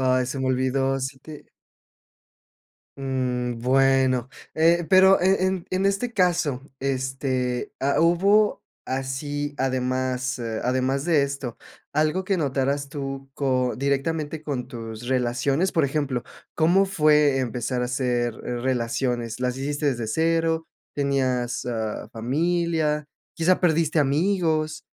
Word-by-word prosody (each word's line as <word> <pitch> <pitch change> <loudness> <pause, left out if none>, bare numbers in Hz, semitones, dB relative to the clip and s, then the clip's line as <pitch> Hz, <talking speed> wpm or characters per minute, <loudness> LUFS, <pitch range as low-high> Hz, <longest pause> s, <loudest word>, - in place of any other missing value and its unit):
Ay, 130 -1 +2
se 130 +2 -4
me 130 - -1
olvidó. 130 +1 +1
Sí 135 +1 -4
te 150 +1 -11 1.5
mm, 125 -3 -2
bueno. 130 -1 +3 0.3
Eh, 170 +2 +3
pero 190 0 +6
e 185 0 +3
en 185 -2 -1
en 190 +1 +1
este 215 +5 0
caso, 170 - +1 0.2
este, 130 -2 -2
ha 140 +2 +2
hubo 195 +6 +3 0.2
así, 145 +3 -3
además, 130 0 -1
eh, 115 -2 -3
además 130 +2 0
de 160 -4 +3
esto, 140 -4 -4 0.4
algo 155 +5 +1
que 195 0 +1
notarás 140 -1 -1
tú 135 -1 -6
co 130 -3 0
directamente 145 +3 -1
con 140 -5 -3
tus 115 0 -8
relaciones. 130 +7 +1
Por 160 -4 +2
ejemplo, 140 -3 -1 0.3
¿cómo 175 +5 +4
fue 150 -6 +3
empezar 125 0 -2
a - - +1
hacer 125 -2 -1
relaciones? 120 -1 -2
¿Las 125 0 -1
hiciste 145 +2 -2
desde 120 -5 0
cero? 165 +3 +1 0.3
¿Tenías, 130 -4 0
ah, 110 -3 -3
familia? 155 +4 0 0.3
¿Quizá 175 +3 +2
perdiste 160 -2 +2
amigos 155 +1 +1
135 Hz, 120 wpm, -24 LUFS, 130-160 Hz, 1.5 s, pero